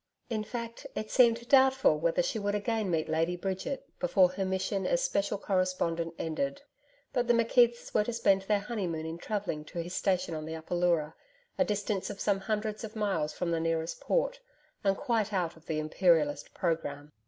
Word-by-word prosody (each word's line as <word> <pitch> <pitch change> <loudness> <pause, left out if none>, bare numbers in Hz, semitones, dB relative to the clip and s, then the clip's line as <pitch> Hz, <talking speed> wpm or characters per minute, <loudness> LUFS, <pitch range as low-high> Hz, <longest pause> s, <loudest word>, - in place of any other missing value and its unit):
In 215 -2 0
fact, 230 +1 -6
it 215 - -4
seemed 235 -2 +4
doubtful 265 - +5
whether 170 +2 +2
she 220 - -1
would 205 0 -1
again 215 -1 -1
meet 160 -2 0
Lady 165 +2 +1
Bridget 195 +10 -4
before 195 -9 +4
her 195 +1 -2
mission 190 +1 -1
as - - +1
Special 200 - 0
Correspondent 185 -4 -1
ended. 275 - -2 0.5
But 245 -2 +1
the 240 - +5
McKeiths 235 +1 +3
were 210 - +4
to 240 - -2
spend 200 -4 +3
their 200 +1 +1
honeymoon 185 -8 -3
in 165 +1 -5
travelling 195 -7 -3
to 175 - -10
his 175 +2 -7
station 185 -4 0
on 155 -1 -4
the 160 +1 -5
Upper 160 +2 -6
Leura, 170 -3 +2 0.5
a 275 - +5
distance 205 -1 -1
of 205 -1 -7
some 200 -2 +1
hundreds 215 +2 -2
of 220 +1 -7
miles 190 -8 0
from 170 - -2
the 165 - +1
nearest 165 0 -1
port, - - 0 0.4
and 195 -1 +2
quite 225 -6 0
out 180 -4 -1
of 160 - -20
THE 155 - -1
IMPERIALIST 155 -1 +2
programme. 150 -4 -2
195 Hz, 190 wpm, -30 LUFS, 165-225 Hz, 0.5 s, doubtful